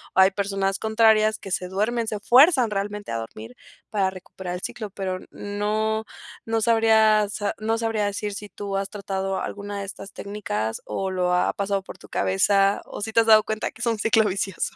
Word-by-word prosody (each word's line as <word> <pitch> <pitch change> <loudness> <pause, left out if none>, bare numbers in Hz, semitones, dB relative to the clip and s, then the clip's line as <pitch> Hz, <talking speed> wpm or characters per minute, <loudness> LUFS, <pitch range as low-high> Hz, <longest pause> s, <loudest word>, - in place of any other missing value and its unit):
Hay 190 +1 +6
personas 195 -1 -1
contrarias 220 -1 +3
que 195 - -10
se 180 0 -1
duermen, 220 +5 -1
se 215 -1 -3
fuerzan 255 - +5
realmente 205 - -3
a 115 - -1
dormir 115 +1 -8 0.4
para 195 -3 +1
recuperar 185 -1 -7
el 180 - -6
ciclo. 215 -3 -5
Pero 190 -1 -3
n - - -14
no, 215 +2 -2 0.4
no 225 0 0
sabría, 220 -1 +5
o - - -13
sea, 205 0 -2
no 225 +1 0
sabría 225 -2 0
decir 205 +1 -3
si 205 0 -7
tú 200 +2 -4
has 195 0 -2
tratado 195 -1 -3
alguna 205 0 -5
de - - -4
estas 195 0 -9
técnicas 110 - -4
o 190 -1 -3
lo 180 -1 +1
ha 180 - +2
pasado 200 -1 -1
por - - -11
tu - - -15
cabeza 195 - +2
o - - -8
si 220 - -4
te 230 - +5
has 225 - +3
dado 215 -1 +7
cuenta 220 0 -2
que 220 - -14
es - - -1
un 225 -2 0
ciclo 225 0 +3
vicioso. 195 -2 -2
205 Hz, 205 wpm, -24 LUFS, 195-220 Hz, 0.4 s, dado